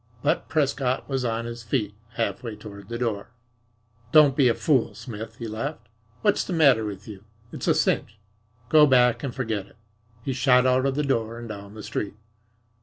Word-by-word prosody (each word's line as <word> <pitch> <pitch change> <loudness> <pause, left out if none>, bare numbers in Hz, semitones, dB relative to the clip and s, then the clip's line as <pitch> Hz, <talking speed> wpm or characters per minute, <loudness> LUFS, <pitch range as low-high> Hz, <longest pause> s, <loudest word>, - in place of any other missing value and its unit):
But - - 0
Prescott 135 -3 0
was 135 -2 -1
on 115 -1 -1
his 120 0 -6
feet, 110 -2 -1 0.2
half 115 -1 -2
way 115 -3 -6
toward 105 -1 -11
the 120 - -3
door. 110 -3 -2 0.8
"Don't 145 -3 +7
be 135 -3 +4
a 115 - +3
fool, 140 -7 +1
Smith," 110 -3 -8
he 115 - -6
laughed. 110 0 -5 0.3
"What's 205 -2 +3
the 185 - -4
matter 140 -9 +5
with 105 -2 -6
you? 100 -3 -10 0.3
It's - - -5
a - - +4
cinch. 105 - 0 0.5
Go 150 +3 +7
back 125 -3 +4
and 135 -4 -4
forget 110 -6 -2
it." - - -22 0.5
He 135 - -2
shot 125 0 +4
out 130 +1 +3
of 135 - -1
the 150 - 0
door 115 -4 -1
and 120 0 -7
down 100 -1 -8
the 110 - -8
street. 100 0 -4
120 Hz, 190 wpm, -25 LUFS, 110-135 Hz, 0.8 s, Don't